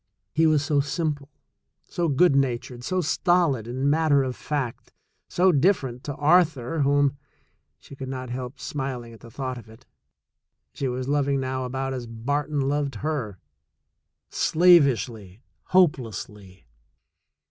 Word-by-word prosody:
He 160 Hz, +1 st, +3 dB
was 150 Hz, -2 st, +2 dB
so 145 Hz, -1 st, +2 dB
simple, 145 Hz, -1 st, -2 dB, 0.5 s
so 175 Hz, -1 st, -2 dB
good 150 Hz, +2 st, +4 dB
natured, 125 Hz, -2 st, -1 dB
so 185 Hz, +7 st, 0 dB
stolid 165 Hz, -, +1 dB
and 130 Hz, +3 st, -2 dB
matter 145 Hz, -2 st, +3 dB
of 130 Hz, -1 st, -3 dB
fact, 140 Hz, -6 st, -4 dB, 0.4 s
so 185 Hz, +1 st, +3 dB
different 140 Hz, -6 st, +1 dB
to 145 Hz, -, -4 dB
Arthur 160 Hz, -2 st, +2 dB
whom 140 Hz, 0 st, +2 dB, 0.6 s
(she 140 Hz, -, -14 dB
could 135 Hz, -1 st, -7 dB
not 130 Hz, -2 st, -5 dB
help 125 Hz, +2 st, -6 dB
smiling 130 Hz, -5 st, -5 dB
at 115 Hz, -, -14 dB
the 115 Hz, -, -13 dB
thought 130 Hz, +1 st, -5 dB
of 115 Hz, -, -15 dB
it) 110 Hz, +4 st, -17 dB, 0.9 s
she 135 Hz, -, -3 dB
was 125 Hz, 0 st, -3 dB
loving 140 Hz, -1 st, +1 dB
now 130 Hz, 0 st, -2 dB
about 135 Hz, +1 st, -3 dB
as 125 Hz, -2 st, -5 dB
Barton 140 Hz, +6 st, -2 dB
loved 140 Hz, 0 st, -1 dB
her 125 Hz, -11 st, -2 dB, 0.5 s
— -, -, -55 dB
slavishly, 130 Hz, -, +3 dB, 0.2 s
hopelessly. 105 Hz, -, 0 dB
135 Hz, 135 wpm, -25 LUFS, 125-150 Hz, 0.9 s, good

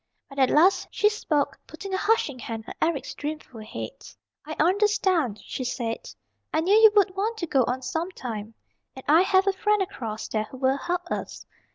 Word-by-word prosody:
But 275 Hz, 0 st, -7 dB
at 265 Hz, -, +5 dB
last 350 Hz, +6 st, +4 dB
she 420 Hz, -, +3 dB
spoke, 300 Hz, -9 st, -1 dB
putting 380 Hz, +5 st, -7 dB
a -, -, +2 dB
hushing 385 Hz, -, +1 dB
hand 225 Hz, -1 st, -5 dB
on -, -, -6 dB
Eric's 320 Hz, -4 st, 0 dB
dreamful 295 Hz, -6 st, -6 dB
head. 355 Hz, -, -7 dB, 0.4 s
"I 310 Hz, -, -4 dB
understand," 365 Hz, -, +2 dB
she 260 Hz, -, -4 dB
said. 235 Hz, -2 st, -3 dB, 0.4 s
"I 315 Hz, -, +1 dB
knew 370 Hz, +5 st, +2 dB
you 440 Hz, 0 st, +8 dB
would 395 Hz, -2 st, +4 dB
want 435 Hz, +4 st, -1 dB
to 350 Hz, -, -2 dB
go 275 Hz, -5 st, +3 dB
on 260 Hz, +1 st, -2 dB
sometime. 250 Hz, -, -4 dB, 0.4 s
And 265 Hz, -, -10 dB
I 315 Hz, +4 st, +6 dB
have 380 Hz, 0 st, +3 dB
a 395 Hz, -, +2 dB
friend 420 Hz, +2 st, +2 dB
across 225 Hz, -, -4 dB
there 215 Hz, -1 st, -1 dB
who 260 Hz, -, -11 dB
will 265 Hz, +1 st, +2 dB
help 355 Hz, +4 st, -2 dB
us. -, -, -4 dB
310 Hz, 190 wpm, -26 LUFS, 255-385 Hz, 0.4 s, you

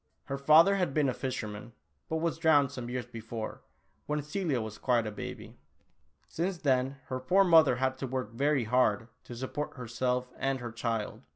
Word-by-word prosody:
Her 135 Hz, -, -4 dB
fa 155 Hz, +4 st, +7 dB
ther 200 Hz, 0 st, +2 dB
had 175 Hz, -7 st, -1 dB
been 150 Hz, -3 st, +3 dB
a -, -, -1 dB
fisherman, 115 Hz, -4 st, -5 dB, 0.4 s
but 160 Hz, -, -1 dB
was 165 Hz, 0 st, -1 dB
drowned 145 Hz, -4 st, +4 dB
some 125 Hz, -4 st, -6 dB
years 125 Hz, -1 st, -3 dB
before, 115 Hz, -2 st, -7 dB, 0.5 s
when 150 Hz, 0 st, -1 dB
Celia 150 Hz, -3 st, -1 dB
was 110 Hz, -2 st, -6 dB
quite 120 Hz, -3 st, +2 dB
a 110 Hz, -, -3 dB
baby. 105 Hz, -, -8 dB, 0.7 s
Since 180 Hz, +2 st, -2 dB
then 135 Hz, -2 st, +1 dB
her 130 Hz, -1 st, -4 dB
poor 185 Hz, +10 st, +4 dB
mother 160 Hz, -7 st, +6 dB
had 130 Hz, +1 st, -1 dB
to 135 Hz, -, -3 dB
work 130 Hz, -3 st, -3 dB
ver}" 140 Hz, +2 st, +1 dB
hard 115 Hz, -2 st, +2 dB, 0.2 s
to 120 Hz, -, -8 dB
support 130 Hz, +4 st, -4 dB
herself 125 Hz, +1 st, -2 dB
and 135 Hz, -1 st, 0 dB
her 120 Hz, -1 st, -6 dB
child. 115 Hz, -1 st, -3 dB
130 Hz, 185 wpm, -30 LUFS, 120-150 Hz, 0.7 s, fa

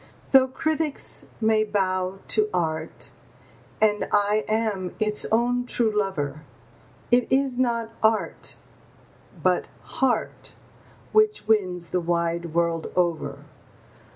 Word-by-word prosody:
Though 265 Hz, -1 st, +7 dB
critics 310 Hz, +2 st, -2 dB
may 220 Hz, -1 st, +3 dB
bow 190 Hz, -2 st, -1 dB
to 215 Hz, -1 st, +3 dB
art, 160 Hz, -3 st, -2 dB, 0.7 s
and 210 Hz, -1 st, +2 dB
I 210 Hz, +1 st, +2 dB
am 215 Hz, -4 st, -1 dB
its 210 Hz, -1 st, +1 dB
own 245 Hz, +2 st, +2 dB
true 225 Hz, -3 st, +1 dB
lover, 155 Hz, -8 st, -1 dB, 0.7 s
It 245 Hz, +1 st, +3 dB
is 265 Hz, -1 st, +2 dB
not 235 Hz, -3 st, 0 dB
art, 220 Hz, 0 st, +1 dB, 0.9 s
but -, -, +2 dB, 0.2 s
heart, 250 Hz, -4 st, -1 dB, 0.6 s
which 430 Hz, -, +3 dB
wins 180 Hz, -6 st, +1 dB
the 180 Hz, -, +1 dB
wide 170 Hz, -1 st, -1 dB
world 170 Hz, -1 st, 0 dB
over. 175 Hz, -3 st, -1 dB
210 Hz, 105 wpm, -25 LUFS, 180-235 Hz, 0.9 s, Though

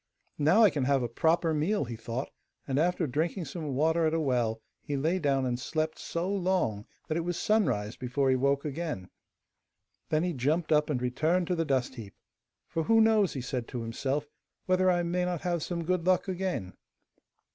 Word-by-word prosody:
'Now 165 Hz, +10 st, +5 dB
I 205 Hz, -, +7 dB
can 140 Hz, -4 st, -1 dB
have 135 Hz, -1 st, +2 dB
a -, -, 0 dB
proper 160 Hz, +7 st, +1 dB
meal,' 155 Hz, +4 st, +1 dB
he 120 Hz, -1 st, -6 dB
thought, 115 Hz, +4 st, -5 dB, 0.4 s
and 135 Hz, 0 st, 0 dB
after 175 Hz, +1 st, +1 dB
drinking 160 Hz, +6 st, -1 dB
some 155 Hz, -4 st, -5 dB
water 160 Hz, +3 st, +2 dB
at 155 Hz, -, 0 dB
a -, -, +1 dB
well 120 Hz, -6 st, 0 dB, 0.2 s
he 145 Hz, -2 st, -3 dB
lay 160 Hz, +7 st, +1 dB
down 135 Hz, -4 st, +1 dB
and 125 Hz, -1 st, -1 dB
slept 155 Hz, +4 st, -2 dB
so 170 Hz, +2 st, -3 dB
long 185 Hz, -, 0 dB, 0.2 s
that 155 Hz, -, -1 dB
it 170 Hz, -, -1 dB
was 175 Hz, 0 st, -2 dB
sunrise 120 Hz, -, +1 dB
before 130 Hz, +2 st, 0 dB
he -, -, +4 dB
woke 140 Hz, +2 st, +1 dB
again. 150 Hz, -, -4 dB, 1.0 s
Then 155 Hz, +1 st, +2 dB
he 180 Hz, -1 st, -1 dB
jumped 155 Hz, +5 st, 0 dB
up 150 Hz, 0 st, +3 dB
and 140 Hz, -4 st, 0 dB
returned 155 Hz, +9 st, +1 dB
to 180 Hz, -, +2 dB
the 165 Hz, -1 st, 0 dB
dust 130 Hz, -3 st, 0 dB
heap. 110 Hz, -6 st, -10 dB, 0.5 s
'For 165 Hz, -1 st, -2 dB
who 225 Hz, +4 st, +5 dB
knows,' 220 Hz, -4 st, +4 dB
he 135 Hz, -, -4 dB
said 125 Hz, -1 st, -3 dB
to 120 Hz, -2 st, -5 dB
himself, 135 Hz, +5 st, -2 dB, 0.4 s
'whether 185 Hz, 0 st, +3 dB
I 175 Hz, -1 st, +2 dB
may 175 Hz, +1 st, 0 dB
not 180 Hz, -2 st, -2 dB
have 175 Hz, -2 st, -1 dB
some 170 Hz, +2 st, -3 dB
good 180 Hz, 0 st, 0 dB
luck 185 Hz, +1 st, +3 dB
again. 180 Hz, -, -3 dB
155 Hz, 200 wpm, -29 LUFS, 130-175 Hz, 1.0 s, I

